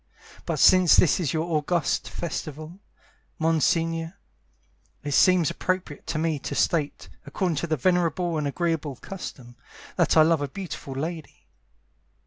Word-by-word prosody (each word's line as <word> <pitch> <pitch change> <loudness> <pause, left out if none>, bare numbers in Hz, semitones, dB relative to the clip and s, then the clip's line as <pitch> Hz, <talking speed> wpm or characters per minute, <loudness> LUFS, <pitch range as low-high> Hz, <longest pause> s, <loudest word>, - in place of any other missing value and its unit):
But - - -1
since 185 -2 +6
this 175 - +4
is 160 -7 -1
your 160 0 -1
august 155 +2 0
festival, 155 +1 -6 0.6
Monsignore, 165 +1 0 0.9
It 145 - -4
seems 175 +2 +4
appropriate 185 -5 -3
to - - -2
me 160 -2 0
to - - -5
state 150 -4 0 0.2
According 180 -6 -1
to 165 +2 -3
a 155 - +2
venerable 175 +1 +1
and 145 - -1
agreeable 160 -2 -2
custom, 130 -7 -9 0.4
That - - +3
I 155 - +8
love 160 -1 +2
a 145 - -1
beautiful 150 -4 -7
lady. 160 +2 -6
165 Hz, 135 wpm, -25 LUFS, 150-175 Hz, 0.9 s, I